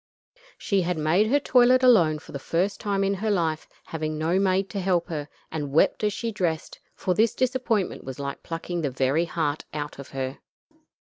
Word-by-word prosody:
She 200 -2 +1
had 180 -1 -1
made 165 +7 +3
her 285 +6 +3
toilet 255 -1 +4
alone 175 -12 +5
for - - -13
the 140 - -5
first 180 +8 -1
time 200 -1 0
in 195 0 +1
her 210 +3 -2
life, 165 -6 0 0.2
having 155 -1 -4
no 165 +4 +1
maid 195 0 +2
to 200 - -3
help 180 -2 0
her, 150 -3 -4 0.2
and 150 -3 -3
wept 160 +7 +3
as 210 - +2
she 230 +2 -3
dressed, 175 -6 -2 0.2
for 185 - 0
this 220 +4 +2
disappointment 250 -6 0
was 130 -1 -7
like 140 0 -5
plucking 170 +1 -4
the 145 - 0
very 135 +5 +1
heart 155 -3 -2
out 145 -1 -5
of 140 - -9
her. 135 0 -4
175 Hz, 195 wpm, -25 LUFS, 155-205 Hz, 0.2 s, alone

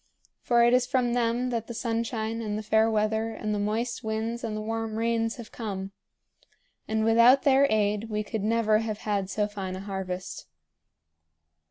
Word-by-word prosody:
For 235 -1 +3
it 240 +1 +4
is 250 0 +3
from 250 -2 +1
them 240 +1 0
that 230 -2 -2
the 235 - -6
sunshine 225 -1 -2
and 210 -2 -3
the 215 - -4
fair 220 +1 +3
weather 220 +1 0
and 215 0 -3
the 205 - -1
moist 230 +5 -2
winds 225 +2 -3
and 215 -2 -3
the - - -3
warm 225 0 -3
rains 225 0 0
have 235 -3 -10
come; 195 -4 -5 1.0
and 220 0 0
without 235 +4 +6
their 275 0 +5
aid 210 +1 +1
we 210 0 -1
could 215 0 -4
never 220 -1 +2
have 220 -2 -3
had 200 -3 -1
so 210 +1 0
fine 195 -3 -5
a - - -6
harvest." 190 -2 -5
220 Hz, 180 wpm, -27 LUFS, 210-235 Hz, 1.0 s, without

